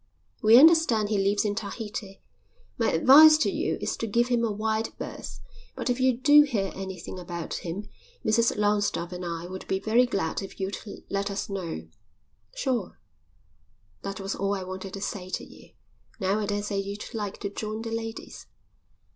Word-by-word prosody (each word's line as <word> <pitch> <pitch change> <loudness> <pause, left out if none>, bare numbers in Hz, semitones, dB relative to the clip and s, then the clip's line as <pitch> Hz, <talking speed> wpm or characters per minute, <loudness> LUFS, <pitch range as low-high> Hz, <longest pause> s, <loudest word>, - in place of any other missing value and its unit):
We 220 +2 +7
understand 280 -8 +6
he 210 -2 +1
lives 200 +2 +2
in 205 - +1
Tahiti. 205 -1 -6 0.5
My 230 - +1
advice 300 - +8
to 310 - +1
you - - -1
is - - -1
to 230 - -3
give 235 +3 +1
him 240 -1 +2
a 225 - +1
wide 220 +1 -1
berth, - - -7 0.4
but - - -1
if 245 - -2
you 255 -2 +3
do 290 +3 +7
hear 225 -10 0
anything 190 -1 -7
about 170 -2 -6
him 185 +5 -5 0.4
Mrs 230 +1 +2
Longstaffe 205 -4 +1
and 180 0 -6
I 170 -1 -4
would 185 +1 -8
be 190 - 0
very 235 +5 +3
glad 190 -7 -2
if 195 - -9
you'd 195 +1 -3 0.3
let 200 0 -1
us 200 0 -4
know." 170 - -5 0.7
"Sure." 255 - -2 1.0
"That 195 +1 -5
was 195 0 -3
all 200 +1 -1
I 190 - -4
wanted 185 +1 -7
to 195 - -7
say 185 -2 -4
to - - -3
you. - - -15 0.5
Now 195 +1 +1
I 210 - -2
daresay 205 0 -2
you'd 200 +1 -6
like 205 -3 -4
to 200 - -2
join 215 +2 -4
the 225 - -5
ladies." 225 0 -6
205 Hz, 180 wpm, -27 LUFS, 195-225 Hz, 1.0 s, advice